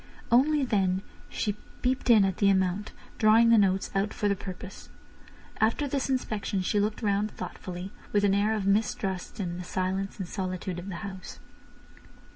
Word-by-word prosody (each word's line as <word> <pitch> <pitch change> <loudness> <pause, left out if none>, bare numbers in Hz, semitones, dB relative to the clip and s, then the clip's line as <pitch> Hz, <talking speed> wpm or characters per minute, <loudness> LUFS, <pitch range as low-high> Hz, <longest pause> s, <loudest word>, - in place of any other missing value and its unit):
Only 280 +4 +4
then 190 -4 +1 0.3
she 205 -2 -2 0.3
peeped 255 0 0
in 215 -4 +7
at 190 -1 -1
the 200 - +4
amount, 190 +1 +1 0.3
drawing 225 +2 +6
the 230 - +7
notes 190 -1 +2
out 195 +1 0
for 205 - 0
the 200 - +2
purpose. 190 0 -9 0.7
After 230 +7 +1
this 275 0 -1
inspection 210 -7 -1
she 205 - +1
looked 210 +3 -1
round 205 0 +1
thoughtfully, 185 -2 -7 0.2
with 205 -1 +2
an 200 -1 +4
air 210 +2 +2
of 205 -3 -2
mistrust 200 -1 -1
in 175 -2 -3
the - - -5
silence 190 +2 -2
and 190 -4 -4
solitude 185 -2 -4
of 185 +3 -7
the 185 - -5
house. 190 -2 -8
200 Hz, 170 wpm, -28 LUFS, 190-215 Hz, 0.7 s, in